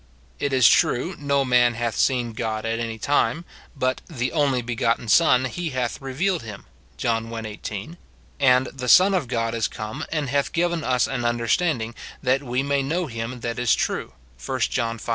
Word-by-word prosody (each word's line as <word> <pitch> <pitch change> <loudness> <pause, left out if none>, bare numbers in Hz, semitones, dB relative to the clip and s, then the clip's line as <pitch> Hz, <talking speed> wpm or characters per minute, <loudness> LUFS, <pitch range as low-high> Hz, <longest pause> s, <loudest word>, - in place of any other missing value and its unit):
It 145 - -1
is 130 -3 +6
true, 165 +9 +2
'No 140 -1 +1
man 120 -2 +4
hath 120 -1 -2
seen 120 -3 +1
God 110 0 -3
at 115 +1 -1
any 115 -1 -3
time,' 145 +6 +1 0.3
but 130 -1 -1
'the 130 -6 -3
only 140 -5 +1
begotten 115 0 -1
Son, 130 0 +5
he 170 +6 -3
hath 130 -2 -3
revealed 165 +7 -1
him,' 105 -3 -9 0.3
John 115 -1 -1
i. 115 -1 -5
18; 105 - -7 0.4
and 130 0 +4
' - - -23
the 125 -2 -6
Son 190 +7 +7
of 175 -9 0
God 115 -2 -1
is 115 -2 0
come, 110 +1 -6
and 155 -3 -1
hath 140 -1 0
given 170 -1 0
us 125 -2 +2
an 125 -3 -3
un 120 0 +1
derstanding, 120 -1 0 0.3
that 130 +1 +2
Ave 125 -1 -1
may 140 0 +1
know 165 +7 -1
him 115 -1 -5
that 120 +1 -3
is 120 -2 +3
true,' - - -2 0.3
1 - - -3
John 115 0 0
V. 115 - -9
125 Hz, 195 wpm, -23 LUFS, 115-140 Hz, 0.4 s, Son